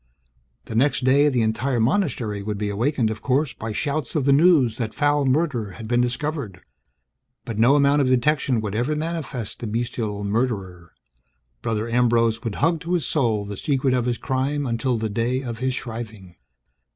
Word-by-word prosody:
The -, -, -7 dB
next 135 Hz, +3 st, +2 dB
day, 140 Hz, +3 st, +4 dB
the 125 Hz, -5 st, +1 dB
entire 120 Hz, +3 st, 0 dB
monastery 115 Hz, -, 0 dB
would 105 Hz, 0 st, -3 dB
be 105 Hz, 0 st, -2 dB
awakened, 115 Hz, +2 st, 0 dB
of 110 Hz, -, -6 dB
course, 140 Hz, +2 st, +1 dB
by 110 Hz, 0 st, -6 dB
shouts 145 Hz, +4 st, -2 dB
of 145 Hz, -4 st, +1 dB
the 140 Hz, -, +5 dB
news 140 Hz, -7 st, +4 dB
that 115 Hz, -3 st, -4 dB
foul 145 Hz, -1 st, +2 dB
murder 130 Hz, -, 0 dB
had 110 Hz, +5 st, -8 dB
been 120 Hz, +1 st, +2 dB
discovered. 125 Hz, -, -3 dB, 0.8 s
But 110 Hz, -2 st, -4 dB
no 125 Hz, +5 st, +5 dB
amount 145 Hz, 0 st, +4 dB
of 135 Hz, -, +2 dB
detection 130 Hz, -1 st, +2 dB
would 105 Hz, -2 st, -4 dB
ever 125 Hz, +8 st, 0 dB
manifest 150 Hz, -8 st, -4 dB
the 115 Hz, -, -5 dB
bestial 110 Hz, -2 st, -3 dB
murderer. 100 Hz, -6 st, -2 dB, 0.7 s
Brother 110 Hz, 0 st, -2 dB
Ambrose 115 Hz, -1 st, +2 dB
would 115 Hz, -4 st, -3 dB
hug 165 Hz, +2 st, +1 dB
to 170 Hz, +3 st, -4 dB
his 170 Hz, -7 st, +1 dB
soul 115 Hz, -7 st, 0 dB
the 100 Hz, 0 st, -6 dB
secret 135 Hz, 0 st, 0 dB
of 125 Hz, -2 st, +1 dB
his 120 Hz, -1 st, 0 dB
crime 135 Hz, +4 st, -1 dB
until 120 Hz, 0 st, 0 dB
the 110 Hz, 0 st, -2 dB
day 120 Hz, +5 st, -1 dB
of 115 Hz, -3 st, -5 dB
his 130 Hz, 0 st, -1 dB
shriving. 110 Hz, -7 st, -7 dB
120 Hz, 180 wpm, -23 LUFS, 110-140 Hz, 0.8 s, the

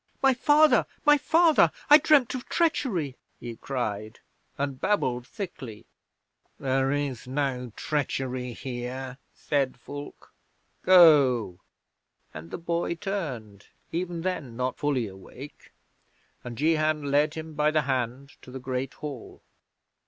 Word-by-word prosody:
"My 270 Hz, -1 st, +6 dB
father! 290 Hz, 0 st, +4 dB, 0.2 s
My 295 Hz, 0 st, +6 dB
father! 325 Hz, +2 st, +4 dB, 0.2 s
I 295 Hz, +1 st, +9 dB
dreamed 280 Hz, -5 st, +4 dB
of 255 Hz, -1 st, -6 dB
treachery," 195 Hz, -, 0 dB, 0.2 s
he 120 Hz, -1 st, -7 dB
cried, 110 Hz, -4 st, -4 dB, 0.4 s
and 140 Hz, -2 st, -3 dB
babbled 125 Hz, -12 st, 0 dB
thickly. 145 Hz, -, -8 dB, 0.7 s
'"There 135 Hz, 0 st, +1 dB
is 140 Hz, -4 st, -3 dB
no 130 Hz, -3 st, -2 dB
treachery 130 Hz, -4 st, -2 dB
here," 130 Hz, +1 st, -6 dB, 0.2 s
said 135 Hz, -4 st, -1 dB
Fulke. 145 Hz, +3 st, -10 dB, 0.5 s
"Go!" 140 Hz, -, +5 dB, 0.7 s
and 80 Hz, +2 st, -9 dB
the -, -, -5 dB
boy 170 Hz, 0 st, -2 dB
turned, 135 Hz, -, -5 dB, 0.2 s
even 175 Hz, 0 st, -3 dB
then 150 Hz, -11 st, -3 dB
not 125 Hz, 0 st, -1 dB
fully 140 Hz, -5 st, 0 dB
awake, 100 Hz, +9 st, -12 dB, 0.7 s
and 120 Hz, -2 st, -7 dB
Jehan 155 Hz, -1 st, +1 dB
led 150 Hz, +2 st, +2 dB
him 160 Hz, 0 st, -7 dB
by 150 Hz, 0 st, +2 dB
the 155 Hz, -1 st, +1 dB
hand 130 Hz, +1 st, -3 dB
to -, -, -14 dB
the 130 Hz, -, -7 dB
Great 130 Hz, +1 st, -4 dB
Hall. 145 Hz, -6 st, -8 dB
140 Hz, 125 wpm, -27 LUFS, 125-170 Hz, 0.7 s, I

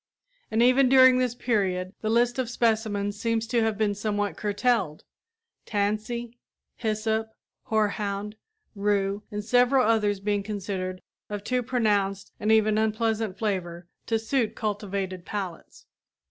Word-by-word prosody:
And 225 Hz, +1 st, +2 dB
even 255 Hz, +1 st, +5 dB
during 260 Hz, -1 st, +7 dB
this 250 Hz, -2 st, 0 dB
period 190 Hz, -6 st, -1 dB
the 215 Hz, -, -1 dB
list 240 Hz, +2 st, +2 dB
of 250 Hz, -3 st, -1 dB
species 215 Hz, -4 st, 0 dB
seems 230 Hz, -1 st, 0 dB
to 235 Hz, +1 st, +1 dB
have 220 Hz, -2 st, 0 dB
been 210 Hz, -1 st, +1 dB
somewhat 205 Hz, 0 st, -2 dB
curtailed 205 Hz, -6 st, 0 dB, 0.6 s
tansy, 220 Hz, +3 st, -2 dB, 0.4 s
hyssop, 220 Hz, 0 st, -1 dB, 0.4 s
horehound, 210 Hz, -1 st, -1 dB, 0.4 s
rue 200 Hz, -1 st, 0 dB
and 210 Hz, 0 st, -5 dB
several 250 Hz, +2 st, +4 dB
others 210 Hz, -3 st, +2 dB
being 205 Hz, 0 st, 0 dB
considered 190 Hz, -3 st, -4 dB, 0.3 s
of 205 Hz, -1 st, -5 dB
too 250 Hz, +3 st, 0 dB
pronounced 205 Hz, -6 st, 0 dB
and 215 Hz, +1 st, +1 dB
even 215 Hz, -1 st, +4 dB
unpleasant 220 Hz, -2 st, 0 dB
flavor 180 Hz, -5 st, -3 dB, 0.2 s
to 225 Hz, -, +2 dB
suit 225 Hz, 0 st, -1 dB
cultivated 200 Hz, -3 st, -3 dB
palates. 190 Hz, -3 st, -6 dB
215 Hz, 130 wpm, -26 LUFS, 200-230 Hz, 0.6 s, during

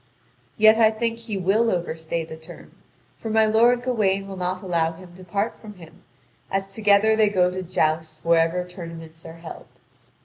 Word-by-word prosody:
Yet 220 Hz, 0 st, +6 dB
I 220 Hz, -1 st, +6 dB
think 230 Hz, +1 st, -3 dB
he 225 Hz, -3 st, -5 dB
will 200 Hz, +5 st, +2 dB
overstay 165 Hz, -3 st, -3 dB
the 160 Hz, -, -9 dB
term, 160 Hz, +2 st, -13 dB, 0.5 s
for 225 Hz, -, -5 dB
my 220 Hz, 0 st, +4 dB
lord 235 Hz, +3 st, +3 dB
Gawain 200 Hz, -6 st, 0 dB
will 195 Hz, -, -7 dB
not 185 Hz, 0 st, -3 dB
allow 165 Hz, -3 st, 0 dB
him 175 Hz, +1 st, -14 dB
to 185 Hz, -, -13 dB
part 200 Hz, +5 st, -2 dB
from 210 Hz, -2 st, -12 dB
him, 165 Hz, -3 st, -15 dB, 0.5 s
as 195 Hz, 0 st, -3 dB
together 210 Hz, +1 st, +3 dB
they 215 Hz, -1 st, +3 dB
go 180 Hz, -3 st, +2 dB
to 185 Hz, +1 st, -4 dB
joust 160 Hz, -3 st, -1 dB
wherever 170 Hz, +1 st, +2 dB
tournaments 165 Hz, -2 st, -10 dB
are 165 Hz, -, -10 dB
held. 165 Hz, -1 st, -10 dB
185 Hz, 175 wpm, -23 LUFS, 165-215 Hz, 0.5 s, Yet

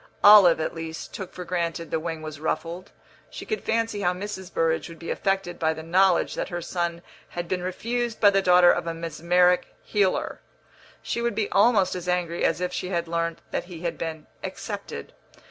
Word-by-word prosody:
(Olive, 200 Hz, -6 st, +9 dB
at 155 Hz, -, -2 dB
least, 165 Hz, -1 st, -7 dB
took 190 Hz, -3 st, -6 dB
for 180 Hz, -, -8 dB
granted 170 Hz, -1 st, -2 dB
the 160 Hz, -, +1 dB
wing 160 Hz, -1 st, -5 dB
was 155 Hz, -2 st, -7 dB
ruffled; 165 Hz, +4 st, -3 dB, 0.4 s
she -, -, -8 dB
could 435 Hz, -, -3 dB
fancy 225 Hz, -2 st, 0 dB
how 180 Hz, -2 st, +2 dB
Mrs. 190 Hz, -1 st, -6 dB
Burrage 165 Hz, +1 st, 0 dB
would 165 Hz, -, -10 dB
be 165 Hz, -, -5 dB
affected 195 Hz, -3 st, -1 dB
by 160 Hz, -1 st, +1 dB
the 160 Hz, -, -7 dB
knowledge 180 Hz, +2 st, +3 dB
that -, -, -3 dB
her 175 Hz, -2 st, -3 dB
son 170 Hz, 0 st, -3 dB, 0.3 s
had 175 Hz, 0 st, -5 dB
been 180 Hz, +1 st, -1 dB
refused 230 Hz, +6 st, -2 dB
by 205 Hz, -2 st, +6 dB
the 195 Hz, 0 st, +3 dB
daughter 180 Hz, -1 st, +6 dB
of -, -, -1 dB
a 165 Hz, -, -2 dB
mesmeric 170 Hz, +2 st, +2 dB
healer. 200 Hz, -3 st, 0 dB, 0.6 s
She 235 Hz, -, -2 dB
would 235 Hz, -2 st, -1 dB
be 210 Hz, -1 st, -1 dB
almost 205 Hz, -3 st, +4 dB
as 180 Hz, -1 st, -6 dB
angry 175 Hz, -1 st, -1 dB
as 165 Hz, 0 st, +2 dB
if 180 Hz, 0 st, -2 dB
she 180 Hz, -, -3 dB
had 170 Hz, -2 st, -1 dB
learnt 165 Hz, 0 st, -2 dB
that -, -, -2 dB
he 175 Hz, -3 st, -10 dB
had 170 Hz, -1 st, -3 dB
been 160 Hz, -2 st, -4 dB, 0.2 s
accepted.) -, -, -6 dB
175 Hz, 195 wpm, -25 LUFS, 165-190 Hz, 0.6 s, Olive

